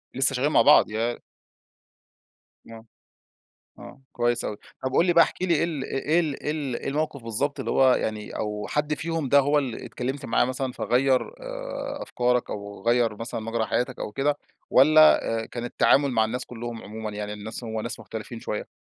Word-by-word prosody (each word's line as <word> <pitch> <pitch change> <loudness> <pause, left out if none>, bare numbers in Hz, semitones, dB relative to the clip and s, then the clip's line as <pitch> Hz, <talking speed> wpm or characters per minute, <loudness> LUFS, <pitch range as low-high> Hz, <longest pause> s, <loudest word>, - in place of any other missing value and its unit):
لسه 135 +1 +3
شغّال 135 +3 +1
مع - - +5
بعض 150 - +6
يا 115 +2 -1 1.5
آه. 115 0 -11 0.9
آه - - -12
كويس 120 0 0
أوي، 105 - -3 0.3
طب 130 - -2
قُل 170 - +3
لي 175 - +4
بقى 170 -1 +7
احكِ - - -8
لي 180 -2 +2
إيه 155 +1 +2
ال 155 -6 -3
إ - - -5 0.2
إيه 165 +3 +4
ال 155 -5 -3
إيه - - -1
ال 145 -5 -2
إيه - - -5
الموقف 145 -2 -2
بالضبط 115 +6 -1
اللي - - -3
هو 130 -1 +5
يعني، 110 -3 -3
أو 105 -1 -3
حد 150 +1 0
فيهم 160 -1 -3
ده 140 - +6
هو 145 +2 +2
اللي 130 -5 -3
اتكلمت 135 +3 -4
معاه - - +3
مثلًا 130 +1 -3
فغيّر 130 +2 +2 0.2
آآ، - - -6
أفكارك 125 0 0
أو 100 0 -7
غيّر 120 -2 +2
مثلًا 115 +1 -5
مَجرى 115 0 -2
حياتك 125 +4 -1
أو - - -5
كده، 145 +4 0 0.3
والّا 155 +4 +6 0.2
آآ، - - -8
كان 120 -1 -6
التعامل 140 +3 +3
مع 110 -3 +2
الناس 125 +3 -3
كلّهم 120 -1 -7
عمومًا 110 +1 -6
يعني 105 0 -5
الناس 105 +3 -7
هو 110 -1 -3
ناس 115 +1 -5
مختلفين 115 +2 -7
شوية؟ 105 - -4
125 Hz, 195 wpm, -25 LUFS, 115-145 Hz, 1.5 s, بقى